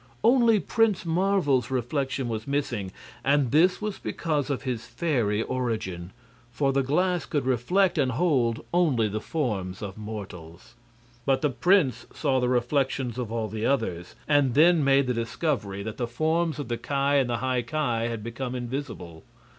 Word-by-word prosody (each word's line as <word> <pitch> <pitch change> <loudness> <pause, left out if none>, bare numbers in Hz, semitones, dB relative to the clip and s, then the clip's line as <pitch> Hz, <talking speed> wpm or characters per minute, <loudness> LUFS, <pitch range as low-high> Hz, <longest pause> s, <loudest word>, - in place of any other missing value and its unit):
Only 235 -3 +5
Prince 210 +2 +1
Marvel's 165 -8 +1
reflection 135 +1 -1
was 110 0 -4
missing, 120 -9 -2 0.3
and 140 -3 +2
this 175 +5 +4
was 210 -2 -3
because 150 -4 -2
of 135 -2 -2
his 125 -4 -3
fairy 120 -5 0
origin. 110 -10 -3 0.4
For 135 +2 0
the 135 - +2
glass 175 +4 0
could 145 -4 -1
reflect 165 - +2
and 130 -3 +1
hold 130 -7 +1
only 150 -11 +3
the 105 +1 -3
forms 105 - -3
of 100 +1 -6
mortals. 100 -4 -9 0.5
But 135 +4 +1
the 150 - +2
prince 135 - +2
saw 130 -1 +1
the 125 -1 +1
reflections 130 0 0
of 120 -3 -4
all 115 -1 -1
the 110 +2 -2
others, 95 -11 -1
and 145 -4 +3
then 165 +1 +5
made 135 0 +4
the 125 - 0
discovery 115 -4 -2
that 110 +1 -6
the 120 - -2
forms 160 +6 0
of 145 - -5
the 120 - -2
Ki 140 +4 -5
and 140 -2 +2
the 120 - 0
High 130 -1 0
Ki 120 -3 -1
had 115 -2 -5
become 120 +2 -4
invisible. 120 - -6
130 Hz, 165 wpm, -26 LUFS, 115-150 Hz, 0.5 s, Only